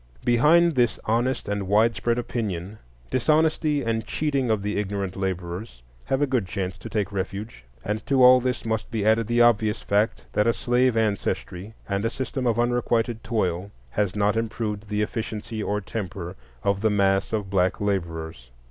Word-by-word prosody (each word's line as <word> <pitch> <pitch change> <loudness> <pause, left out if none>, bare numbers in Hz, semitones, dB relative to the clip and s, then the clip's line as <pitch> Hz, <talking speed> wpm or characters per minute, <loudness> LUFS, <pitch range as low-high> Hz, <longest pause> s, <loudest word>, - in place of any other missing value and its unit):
Behind 160 +8 +5
this 120 -4 +2
honest 120 +4 0
and 100 -1 -2
widespread 115 +3 +2
opinion 110 -5 -3 0.3
dishonesty 155 +2 +2
and 115 -1 -1
cheating 140 -5 0
of 110 -2 +1
the 105 +1 -2
ignorant 100 -2 -3
laborers 95 - -4 0.2
have 135 +2 +1
a - - +5
good 125 -8 0
chance 95 0 -3
to - - -8
take 105 -3 -1
refuge. 100 - -5 0.2
And 105 +1 -2
to 135 -2 +4
all 125 0 +9
this 125 -1 -2
must 110 -1 -2
be 110 -3 -2
added 110 0 +3
the 120 0 +4
obvious 110 -2 +2
fact 105 +3 0
that 105 - +2
a 115 - +4
slave 125 0 +2
ancestry 105 -1 -2
and 100 0 -1
a 115 - +1
system 130 +1 -3
of 115 -1 +1
unrequited 120 -1 0
toil 95 -4 -1 0.2
has 105 +3 0
not 105 0 +2
improved 110 -2 -3
the 105 0 0
efficiency 110 0 -4
or 105 0 -1
temper 95 -4 -5 0.3
of 100 0 +1
the 110 - +3
mass 95 -1 +2
of 105 -3 -2
black 95 -1 +2
laborers. 80 -10 -3
110 Hz, 170 wpm, -25 LUFS, 100-120 Hz, 0.3 s, all